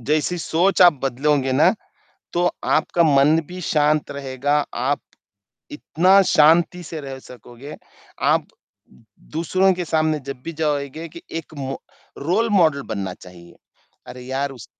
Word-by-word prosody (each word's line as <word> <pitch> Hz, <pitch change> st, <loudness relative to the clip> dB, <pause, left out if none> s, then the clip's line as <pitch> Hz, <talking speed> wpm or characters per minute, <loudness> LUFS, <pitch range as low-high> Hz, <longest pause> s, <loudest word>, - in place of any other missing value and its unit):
जैसी 155 Hz, +7 st, 0 dB
सोच 175 Hz, +5 st, +1 dB
आप 175 Hz, -2 st, +8 dB
बदलोगे 135 Hz, +1 st, 0 dB
ना, 155 Hz, +9 st, +4 dB, 0.6 s
तो 175 Hz, +1 st, +2 dB
आपका 170 Hz, -, +1 dB
मन 150 Hz, +1 st, +4 dB
भी 180 Hz, +1 st, -8 dB
शांत 150 Hz, -2 st, +1 dB
रहेगा, 140 Hz, +1 st, -2 dB, 0.2 s
आप 135 Hz, +4 st, -1 dB, 0.7 s
इतना 180 Hz, +6 st, +3 dB
शांति 170 Hz, +1 st, +3 dB
से 160 Hz, -1 st, -7 dB
रह 135 Hz, -2 st, -8 dB
सकोगे। 125 Hz, +3 st, -12 dB, 0.5 s
आप -, -, +2 dB, 0.9 s
दूसरों 185 Hz, +4 st, +2 dB
के 180 Hz, 0 st, -4 dB
सामने 155 Hz, -1 st, 0 dB
जब 135 Hz, -2 st, -7 dB
भी 165 Hz, -, -5 dB
जाओगे 150 Hz, 0 st, -3 dB
कि 170 Hz, +2 st, -12 dB, 0.2 s
एक 160 Hz, -1 st, -11 dB
मो 135 Hz, -1 st, -5 dB, 0.4 s
रोल 190 Hz, +10 st, 0 dB
मॉडल 160 Hz, -8 st, +3 dB
बनना 100 Hz, -4 st, -4 dB
चाहिए। 85 Hz, -1 st, -15 dB, 0.5 s
अरे 125 Hz, -, -9 dB
यार! 135 Hz, +2 st, -3 dB
उस 125 Hz, -5 st, -12 dB
150 Hz, 140 wpm, -21 LUFS, 135-165 Hz, 0.9 s, आप